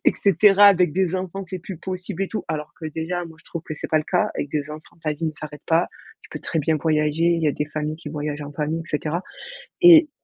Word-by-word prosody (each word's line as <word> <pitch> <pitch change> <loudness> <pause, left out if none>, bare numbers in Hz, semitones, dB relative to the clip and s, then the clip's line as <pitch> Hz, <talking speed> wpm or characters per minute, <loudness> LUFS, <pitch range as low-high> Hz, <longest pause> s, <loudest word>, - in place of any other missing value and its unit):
et - - +5
cetera, 200 +1 +6
avec 180 -6 +5
des 185 -1 +1
enfants, 190 +1 -4
c'est 185 - -4
plus 180 0 -8
possible» 185 +1 -4
et - - -7
tout, 220 - -4
alors 150 -1 -4
que 160 - -9
déjà, 165 +3 -3
moi, 160 -1 -12
je - - -20
trouve 170 -1 -6
que 155 - -7
c'est - - -6
pas 155 - +2
le 155 - +1
cas, 210 +6 +1
avec 145 - -3
des 150 0 -2
enfants 155 +2 -11
ta 155 -1 0
vie 165 +3 -5
ne 155 - -1
s'arrête 150 -1 -9
pas, 165 +1 +3 0.3
tu - - -16
peux - - -7
très 165 - -2
bien 155 +1 +1
voyager, 155 +1 +1
il 170 -1 +2
y 155 - +3
a - - +1
des 150 - -2
familles 155 0 -4
qui 150 -3 -8
voyagent 150 -1 -4
en 145 - -8
famille 155 +3 -2
et 165 - -9
cetera 155 +4 -2 0.6
et 335 -3 +9
160 Hz, 270 wpm, -23 LUFS, 150-185 Hz, 0.6 s, et